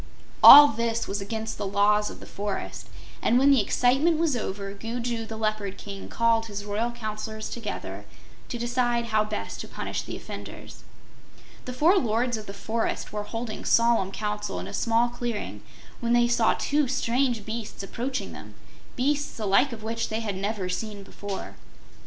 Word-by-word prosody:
All 290 0 +12
this 230 0 -1
was 200 +1 -3
against 220 +2 -4
the 205 - -2
Laws 210 +1 +3
of - - -10
the - - -11
Forest, 200 0 -5 0.3
and 240 - +3
when 275 +2 +5
the 270 -5 +5
excitement 270 +10 +2
was 320 -4 +1
over, 200 -3 -4
Gugu 230 +2 -4
the 220 - -6
Leopard 215 -3 -2
King 200 -1 -8
called 230 -1 +2
his 205 -1 -6
royal 210 +3 -1
Counselors 215 -1 -5
together 230 -3 -6 0.4
to 240 - -3
decide 240 0 0
how 215 0 +4
best 215 0 -5
to - - -8
punish - - -4
the - - -6
offenders. - - -9 0.8
The 250 - -5
four 330 +10 +4
lords 240 +1 0
of 215 -1 -7
the - - -5
forest 220 +4 -3
were 210 - -2
holding 225 +1 -5
solemn 230 -5 +3
council 210 - -3
in 90 - -6
a 100 - -8
small 230 +1 +2
clearing 240 -2 -4 0.4
when 235 -1 0
they 240 0 +4
saw 235 -2 +3
two 295 -1 +1
strange 245 -3 0
beasts 220 -2 -5
approaching 255 +7 -4
them - - -11 0.4
beasts 285 +3 0
the 220 - -3
like 200 +8 +4
of 220 -2 -8
which 230 +1 -2
they 220 +1 -2
had 205 -4 -3
never 200 0 -2
seen 205 +2 -4
before. 200 0 -7
225 Hz, 175 wpm, -26 LUFS, 210-240 Hz, 0.8 s, All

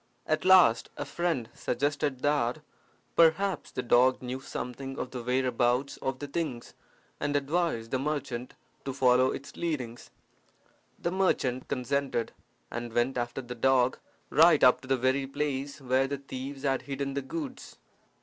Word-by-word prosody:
At 155 +2 0
last 170 -12 +6
a - - -3
friend 170 -9 -1
suggested 145 +1 -1
that, 145 -1 +1 0.5
perhaps, 170 +4 +3
the 125 - -4
dog 125 +2 +4
knew 125 +1 -5
something 135 +1 -6
of 130 - -4
the 125 - -5
whereabouts 125 +1 +1
of 135 0 -3
the 145 - -5
things, 140 -5 -4 0.5
and 145 0 -1
advised 145 -5 0
the 130 - +1
merchant 135 -4 -3 0.3
to 135 - -4
follow 130 -1 +4
its 140 +1 -6
leadings. 130 -9 -4 0.9
The 170 - -2
merchant 135 -9 0
consented, 135 -2 -1 0.4
and 120 0 -5
went 120 +3 +1
after 120 +2 -3
the 125 0 -6
dog 125 +1 +2 0.3
right 160 -1 +6
up 125 - +6
to 130 - -12
the 135 0 +2
very 130 +2 +1
place 140 0 -3
where 130 0 +1
the 140 +1 -3
thieves 135 0 -7
had 135 -2 +1
hidden 140 0 -4
the 140 - -1
goods. 265 - -7
135 Hz, 150 wpm, -29 LUFS, 125-145 Hz, 0.9 s, last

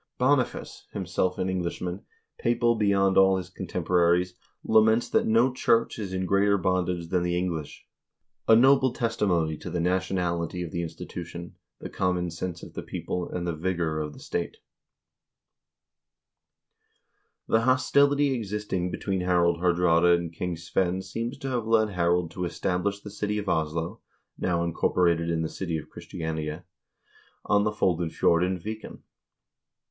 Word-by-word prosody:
Boniface, 130 0 0
himself 90 -1 -1
an 95 - -1
Englishman, 90 0 -3 0.4
papal 120 0 +2
beyond 100 -3 +3
all 95 0 +5
his 90 -1 -6
contemporaries, 90 0 +1 0.3
laments 110 +1 +4
that - - +1
no 115 +4 +3
church 115 -2 +1
is 100 -3 -4
in 95 0 -2
greater 100 +2 +3
bondage 90 -2 -1
than 90 0 +1
the 85 0 0
English, 85 -5 -4 0.3
— - - -55
a 110 - +9
noble 130 +2 +5
testimony 95 -10 0
to - - -8
the 90 - -2
nationality 90 -1 -1
of 85 - -6
the 85 - -2
institu 85 +1 -6
tion, 85 +1 -9 0.3
the - - -6
common 90 -2 -1
sense 85 +1 -5
of - - -10
the - - -5
people, 90 -1 -4
and 90 -1 -4
the 85 - -1
vigor 85 -1 -1
of 75 -1 -4
the - - -13
state - - -4
I" - - -39 2.9
The 110 - +4
hostility 140 +3 +3
existing 105 -5 -2
between 95 0 -2
Harald 85 -2 +2
Haardraade 85 -1 +4
and 85 -1 -5
King 85 0 -3
Svein 90 +2 -1
seems 115 +7 -4
to 135 0 -5
have 120 -4 -2
led 110 -1 +3
Harald 85 -2 +1
to 90 +1 -3
establish 90 +3 -1
the 105 - -9
city 105 +1 -2
of 105 -1 -4
Oslo 80 +5 -1 0.3
(now 85 -2 0
incorporated 85 0 +1
in 80 -1 0
the - - -1
city 85 -1 -3
of 75 - -9
Christiania) 80 0 -5 0.8
on 105 0 +3
the 105 - +1
Foldenfjord 85 -3 +1
in 90 0 0
Viken. 110 +5 -7
90 Hz, 150 wpm, -27 LUFS, 85-105 Hz, 2.9 s, a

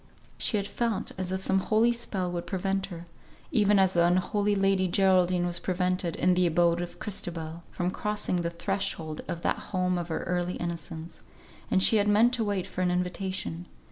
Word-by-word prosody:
She 215 - +1
had 200 - -1
felt 230 0 -2
as 185 -1 -3
if 190 0 -2
some 190 0 +3
holy 225 +4 +3
spell 195 -6 -3
would 175 -1 -4
prevent 195 0 -1
her 170 -3 -8 0.5
(even 210 -1 +4
as 190 -1 +4
the 170 - +4
unholy 185 +4 +2
Lady 195 -1 +2
Geraldine 180 -1 +3
was 175 0 -1
prevented, 180 -1 -1
in 180 +1 +3
the 180 0 +3
abode 170 +1 +2
of 175 0 -6
Christabel) 170 -5 -5
from 180 0 -2
crossing 210 -2 -2
the 170 -1 -1
threshold 170 -3 -3
of 170 - -4
that - - 0
home 180 -2 0
of 170 - -4
her 160 - -3
early 180 0 -1
innocence; 165 -1 -6 0.5
and 190 - +3
she 220 - +6
had 205 0 +2
meant 220 +4 +4
to 240 -2 +1
wait 200 -3 -1
for 185 - -5
an 180 - +2
invitation. 180 -1 -2
185 Hz, 190 wpm, -28 LUFS, 175-195 Hz, 0.5 s, she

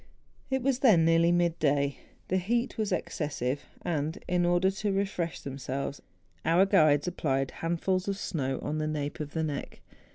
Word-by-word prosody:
It 265 -2 0
was 265 -1 +1
then 205 -12 +5
nearly 165 +1 +4
mid 175 -1 +2
day; 140 -2 +1 0.3
the 185 - +1
heat 235 +7 0
was 215 -2 0
ex¬ 180 - -1
cessive; 145 -3 -2 0.2
and, 155 -1 -1
in 175 -1 +2
order 175 +2 +3
to 205 +1 -2
refresh 195 -4 -2
themselves, 140 +1 -4 0.4
our 170 +4 +4
guides 155 -5 +4
applied 135 -6 -1
handfuls 180 +3 -1
of 200 -1 -1
snow 135 -9 -2
on 155 +1 -2
the 155 - -1
nape 145 -1 -3
of 150 -1 -5
the 160 - -1
neck. 150 -2 -4
165 Hz, 170 wpm, -29 LUFS, 145-190 Hz, 0.4 s, then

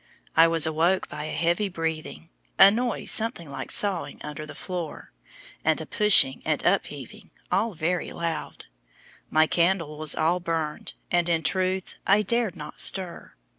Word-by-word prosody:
I 165 +1 +6
was 165 -1 +5
awoke 165 +4 0
by 150 - -6
a - - -5
heavy 170 +6 0
breathing, 160 - -5 0.3
a 195 - +8
noise 240 +2 -1
something 215 - -1
like - - -7
sawing 200 -4 +1
under 150 0 -7
the - - -10
floor, 175 -4 -6 0.5
and 160 0 +1
a 160 - -6
pushing 195 -9 +5
and - - -2
upheaving, - - -2 0.2
all 215 0 0
very 170 +2 -2
loud. 165 -2 -5 0.6
My 155 0 +4
candle 170 -3 0
was 155 -1 0
all 170 +3 +1
burned, 165 -3 -4 0.2
and, 175 -1 +1
in 165 -1 0
truth, 185 0 -1
I 205 +2 +4
dared 225 -2 0
not 150 -3 -5
stir. 185 -3 0
170 Hz, 155 wpm, -25 LUFS, 155-190 Hz, 0.6 s, a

